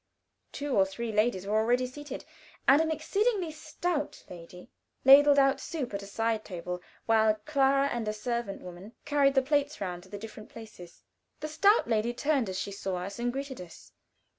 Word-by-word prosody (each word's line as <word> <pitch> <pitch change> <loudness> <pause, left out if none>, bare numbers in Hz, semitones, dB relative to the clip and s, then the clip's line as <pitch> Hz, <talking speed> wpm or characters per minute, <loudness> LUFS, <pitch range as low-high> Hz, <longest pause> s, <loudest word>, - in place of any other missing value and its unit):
Two 285 -2 -3
or 195 - +6
three 220 +4 -4
ladies 210 -3 +1
were 205 - -2
already 240 +3 +2
seated, 275 +2 -8 0.4
and 280 +3 +7
an 320 - 0
exceedingly 370 +4 0
stout 310 0 -3
lady 180 +1 -11 0.4
ladled 285 +2 +8
out 275 0 +4
soup 280 -10 -5
at 200 - -3
a 200 - -9
side 225 +1 -1
table, 180 -1 -6 0.2
while 220 -1 +4
Clara 275 -2 +3
and 235 -4 -3
a 215 - 0
servant 215 -2 -4
woman 180 +5 -10
carried 285 -1 +3
the 265 - +4
plates 290 +2 0
round 180 -3 -4
to 190 - -17
the 205 - -6
different 215 0 -10
places. 215 -6 -12 0.4
The 305 - -4
stout 395 - +3
lady 230 +1 0
turned 280 -6 +1
as 185 - -4
she 200 - -3
saw 195 -1 -4
us, 190 +4 -5
and 240 0 0
greeted 270 -3 -5
us. 175 -2 -13
240 Hz, 185 wpm, -29 LUFS, 200-285 Hz, 0.4 s, ladled